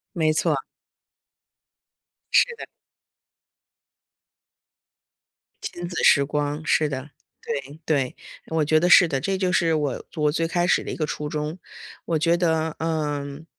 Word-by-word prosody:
没 155 -2 +2
错。 155 -4 0 1.7
是 485 - +5
的。 - - -8 3.0
亲 175 0 -5
子 175 - -3
时 140 -2 +6
光， 145 +1 -2
是 155 -1 +2
的， 140 +1 -6 0.3
对， 140 0 -5
对， 140 -5 0 0.3
我 160 -2 0
觉 155 +2 +3
得 180 - +2
是 175 -1 +8
的， 135 -3 -2
这 195 -1 -1
就 185 -1 0
是 165 -3 +2
我 145 -4 -2
我 150 -1 +2
最 165 +1 0
开 175 +1 0
始 - - +3
的 - - -5
一 - - -4
个 155 - 0
初 150 0 -4
衷。 150 +3 -3 0.5
我 160 -2 0
觉 170 +2 +3
得， 160 -2 0
嗯， 150 -2 -3
155 Hz, 150 characters per minute, -24 LUFS, 145-165 Hz, 3.0 s, 是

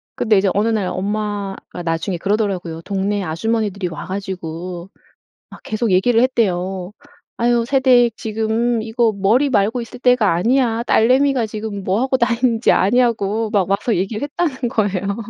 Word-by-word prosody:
근데 220 -3 +2
이제 195 +1 +2
어느 210 +3 +1
날 215 -4 0
엄마가 200 -1 -4
나중에 165 +3 -2
그러더라고요. 190 -4 -2
동네 200 +1 -1
아주머니들이 200 +3 -2
와 165 - -7
가지고 180 -2 -6 0.6
막 - - -13
계속 220 +1 -2
얘기를 225 +6 +3
했대요. 190 -6 -1 0.5
"아휴 235 0 +2
새댁 250 -3 +3
지금 225 +2 -1
이거 225 0 +1
머리 220 +9 +2
말고 220 +1 +1
있을 230 0 -9
때가 245 -5 +3
아니야. 235 +4 +1
딸내미가 255 +1 +3
지금 215 -1 -6
뭐 195 +5 0
하고 260 0 +1
다니는지 235 -1 +2
아냐고?" 225 0 +1
막 195 -4 +1
와서 210 +4 +1
얘기 195 +4 -2
했다는 285 -3 -2
거예요. 200 -3 -1
215 Hz, 335 characters per minute, -19 LUFS, 195-235 Hz, 0.6 s, 얘기를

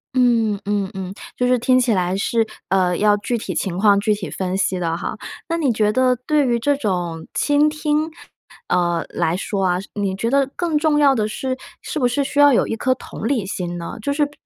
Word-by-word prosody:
嗯， 230 -5 +3
嗯， 200 -1 -1
嗯， 190 -1 -5 0.2
就 250 - +1
是 250 0 +4
听 255 +2 +3
起 240 -3 +2
来 185 0 0
是， 225 +2 +1 0.2
呃， 180 -1 +2
要 210 0 +4
具 235 +4 -2
体 - - -5
情 180 -3 -2
况 200 0 +5
具 215 0 +2
体 205 -2 -5
分 185 0 -2
析 190 -1 0
的 165 -2 -1
哈。 - - -4 0.3
那 335 - -1
你 285 -7 +1
觉 210 -1 +2
得 255 -1 +3
对 300 -2 +3
于 235 -1 +1
这 285 +4 +2
种 175 - -2
倾 290 +1 +3
听， 305 +1 -1 0.6
呃， 175 -2 +1
来 165 +2 0
说 195 0 -2
啊， 180 -1 +2 0.2
你 200 -2 -2
觉 230 +4 -1
得 275 +1 +2
更 340 -3 0
重 300 -1 +2
要 280 -2 +5
的 215 -4 0
是， 260 +4 -3 0.2
是 305 - -4
不 245 - +3
是 275 +3 0
需 285 +1 0
要 290 -1 +7
有 240 - +3
一 - - -2
颗 255 +3 0
同 225 - -6
理 235 -8 0
心 175 -2 -4
呢？ 170 +4 -6
就 280 - -1
是 295 0 +1
比 290 - -14
225 Hz, 240 characters per minute, -20 LUFS, 190-275 Hz, 0.6 s, 要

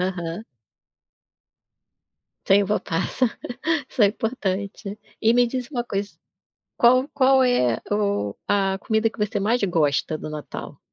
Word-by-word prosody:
Aham. 180 +1 -3 2.0
Sem 200 +1 +5
uva-passa 195 +2 -1 0.6
Isso 245 - 0
é 205 - +8
importante. 200 -2 -3 0.2
E 225 0 +5
me 245 0 +4
diz 250 0 -4
uma 240 -4 -2
coisa 200 -2 -3 0.7
qual 255 +3 +4
qual 265 -2 +4
é 125 - +2
o 200 - 0
a 195 -1 +1
comida 220 +1 +1
que - - -18
você 210 -1 -1
mais 225 +5 +1
gosta, 155 -4 +1
do 155 - -7
Natal? 150 -1 -7
205 Hz, 125 wpm, -23 LUFS, 190-240 Hz, 2.0 s, é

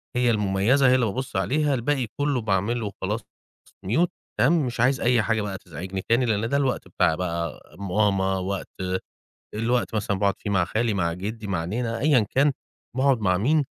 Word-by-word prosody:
هي 125 -1 +3
المميزة، 105 +6 +3
هي 130 - +5
اللي 125 -2 +2
بابُصّ 130 +6 -4
عليها، 145 +1 +1
الباقي 130 0 0
كُلّه 145 -3 +1
باعمل 105 +3 0
له 115 - -3
وخلاص 100 - -3 0.7
mute 160 - +3 0.3
تمام، 165 -4 +4
مش 120 -2 -5
عايز 125 +2 +3
أي 120 -1 +3
حاجة 110 0 0
بقى 100 -2 -4
تزعجني 95 +2 -6
تاني 120 +3 +4
لأن 110 -1 0
ده 140 - +2
الوقت 135 -3 -1
بتاع 80 - +2
بقى 85 -1 -3 0.2
ماما، 95 -1 +1
وقت 95 +1 -3 0.9
الوقت 115 +2 0
مثلًا 105 -2 -1
باقعد 100 -1 +2
فيه 105 - -4
مع 95 -3 +3
خالي 110 +4 0
مع 85 -4 0
جِدّي، 105 +5 -5
مع 90 -4 -1
نينا 115 +5 -2
أيًا 135 -7 +4
كان 140 +2 +3 0.4
باقعد 135 -2 +3
مع 90 -3 +2
مين، 145 - +2
110 Hz, 185 wpm, -25 LUFS, 95-125 Hz, 0.9 s, هي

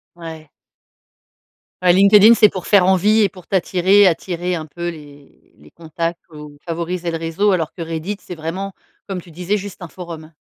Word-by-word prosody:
Ouais. 160 -3 -10 1.3
Ouais. 180 - +5
LinkedIn, 200 +4 +7
c'est 215 -2 +6
pour 185 -3 -7
faire 200 -3 +5
envie 200 +4 +3
et 205 - +3
pour 185 -1 -16
t'attirer, 190 +1 +3
attirer 180 +1 -1
un 160 -2 -5
peu 170 +3 -5
les 145 -3 -13 0.2
les 75 +1 -19
contacts 165 +1 -4
ou 150 -1 -11
favoriser 170 +1 -3
le 165 - -2
réseau 165 +6 0
alors 165 -4 -1
que 175 - -9
Reddit, 165 +5 -4
c'est 180 - -9
vraiment, 180 +5 -5 0.3
comme 190 -2 -4
tu 170 - -16
disais, 180 +5 -2
juste 200 -1 -9
un 175 - -6
forum. 165 -2 -10
175 Hz, 180 wpm, -19 LUFS, 165-190 Hz, 1.3 s, LinkedIn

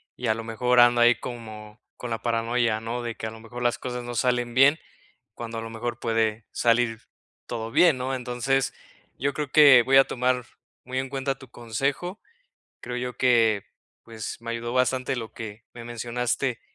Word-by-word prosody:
y 125 - -4
a 110 - +2
lo 115 - -6
mejor 125 +2 +1
ando 120 0 +6
ahí 120 +1 +6
como 110 -2 -9 0.2
con 125 - -6
la 115 0 -3
paranoia, 115 -1 0
¿no? 115 +2 -4
De 120 -1 -4
que - - -6
a 110 - -4
lo 110 - -11
mejor 120 +2 -8
las 120 0 +1
cosas 125 -1 -5
no 120 0 -6
salen 120 0 0
bien, 135 +4 +6 0.6
cuando 115 -1 -6
a - - -5
lo 115 - -6
mejor 120 +1 -4
puede 115 -2 0
salir 115 -1 +1 0.4
todo 115 -1 -5
bien, 165 +1 +5
¿no? 130 +1 -2
Entonces, 130 +2 -1 0.5
yo 140 +2 0
creo 150 -2 -3
que 140 -5 +8
voy 135 +2 +4
a 135 - +9
tomar 125 0 0 0.4
muy 130 +1 -5
en 130 0 -2
cuenta 135 0 -2
tu 130 - -13
consejo. 135 - -3 0.6
Creo 125 0 -5
yo 125 0 -4
que, 115 -5 +3 0.4
pues 110 -2 -7
me 115 - -5
ayudó 115 +1 -4
bastante 130 0 +1
lo 115 -2 -6
que 110 0 -8
me 120 -1 -10
mencionaste 120 +1 -2
120 Hz, 190 wpm, -25 LUFS, 115-125 Hz, 0.6 s, a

